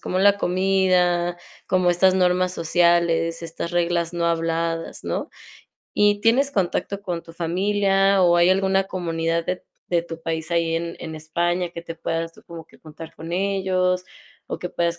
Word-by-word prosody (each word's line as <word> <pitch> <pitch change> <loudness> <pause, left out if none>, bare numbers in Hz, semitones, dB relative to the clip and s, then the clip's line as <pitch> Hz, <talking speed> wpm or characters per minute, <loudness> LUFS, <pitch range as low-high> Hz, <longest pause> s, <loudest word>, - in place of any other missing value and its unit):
como 185 - -2
la 200 +1 +4
comida, 180 -2 +2 0.3
como 185 -1 +2
estas 185 +2 +4
normas 180 0 +2
sociales, 170 -1 +2
estas 165 0 -5
reglas 170 -1 0
no 170 0 0
habladas, 165 0 -2
¿no? - - -3 0.6
Y 205 0 +3
¿tienes 255 +6 +3
contacto 195 -2 -1
con 175 -4 -4
tu 165 - -13
familia 195 +3 +2
o 175 -1 +5
hay 175 +1 +5
alguna 190 0 +2
comunidad 165 -3 -2
de 180 - -1
t - - -34 0.2
de 170 -1 +1
tu 165 -1 -9
país 160 0 -3
ahí 165 -1 +1
en 170 0 -4
en 160 -1 -6
España 170 +3 -1
que 170 - -7
te 165 -1 -7
puedas 165 0 -3
como 165 -2 -10
que - - -20
juntar 160 +1 -11
con 165 +1 -8
ellos 185 -1 0 0.4
o - - -5
que 180 - -5
puedas 170 -1 -1
175 Hz, 170 wpm, -23 LUFS, 165-185 Hz, 0.6 s, o